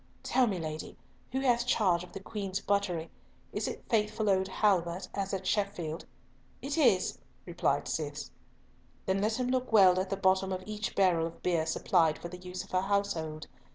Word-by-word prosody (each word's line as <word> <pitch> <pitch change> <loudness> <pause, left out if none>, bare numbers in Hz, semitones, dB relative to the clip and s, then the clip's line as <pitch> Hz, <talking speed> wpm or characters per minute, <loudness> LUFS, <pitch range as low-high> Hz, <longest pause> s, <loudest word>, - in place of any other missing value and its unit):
"Tell 255 -2 +3
me, 195 -4 -1
lady, 155 -2 -5 0.3
who 265 +1 -1
hath 240 -2 +2
charge 180 -8 +3
of 180 - -12
the - - -7
Queen's 195 -1 -4
buttery? 195 -6 -1 0.4
Is - - -1
it - - -5
faithful 215 -1 +1
old 190 0 +2
Halbert 185 -3 +1
as 195 -1 -2
at 190 -1 -3
Sheffield?" 185 -6 -1 0.5
"It 275 +2 -3
is," 245 - +3 0.3
replied - - 0
Cis. - - -3 0.7
"Then 190 +1 +1
let 220 +3 0
him 250 0 0
look 255 -1 0
well 190 -4 +7
at 185 0 -2
the 195 - -1
bottom 190 0 +2
of 185 0 -3
each 210 -1 -4
barrel 175 -4 +3
of 165 - -12
beer 165 -3 +1
supplied 160 -1 +2
for 170 - -7
the 180 +1 -9
use 180 0 -6
of - - -17
her 185 - +2
household. 190 -6 -1
190 Hz, 185 wpm, -31 LUFS, 180-210 Hz, 0.7 s, well